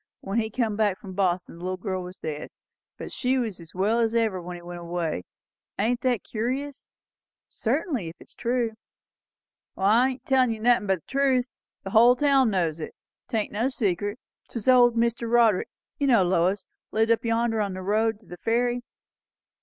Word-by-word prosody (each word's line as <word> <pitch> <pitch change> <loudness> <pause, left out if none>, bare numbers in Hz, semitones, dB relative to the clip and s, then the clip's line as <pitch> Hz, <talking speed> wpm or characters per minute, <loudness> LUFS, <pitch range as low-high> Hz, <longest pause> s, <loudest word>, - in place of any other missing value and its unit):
When 195 +4 -1
he 220 -1 -1
come 225 -2 -1
back 205 -3 +1
from 190 -1 -10
Boston, 180 -3 -1
the - - -10
little 185 0 -2
girl 185 -1 -3
was 180 +1 -9
dead; 150 -2 -5 0.5
but - - -7
she 255 +1 0
was 225 -7 -2
as 165 0 -13
well 210 +5 +2
as 230 0 +1
ever 220 -5 +1
when 175 +1 -7
he 175 - -10
went 175 0 -7
away. 170 - -3 0.5
Ain't 235 +4 0
that 250 -4 +1
curious?" 260 +5 -4 0.6
"Certainly; 255 - -1
if 165 - -11
it - - -16
is - - -17
true." 240 -1 0 1.1
"I'm 235 +7 +3
tellin' 260 -2 +3
you 220 - -7
nothin' 235 -1 +3
but 190 -3 +1
the - - -64
truth. 265 -2 +2 0.4
The 195 - -6
hull 235 +4 +7
town 275 -2 +4
knows 170 -5 0
it. 155 - -7 0.3
'Tain't 220 -2 -1
no 225 +4 0
secret. 205 -4 -1 0.3
'Twas 230 -1 -6
old 245 -2 +6
Mr. 235 0 0
Roderick, 230 -5 +4 0.3
you 285 - +1
know, 235 -7 +5
Lois; 185 +2 +1 0.2
lived 225 +1 +2
up 230 - +2
yonder 230 -1 +1
on 200 -2 -2
the 185 - -6
road 215 +2 +1
to - - -22
the 175 - -10
ferry. 240 +3 0
220 Hz, 185 wpm, -26 LUFS, 185-240 Hz, 1.1 s, hull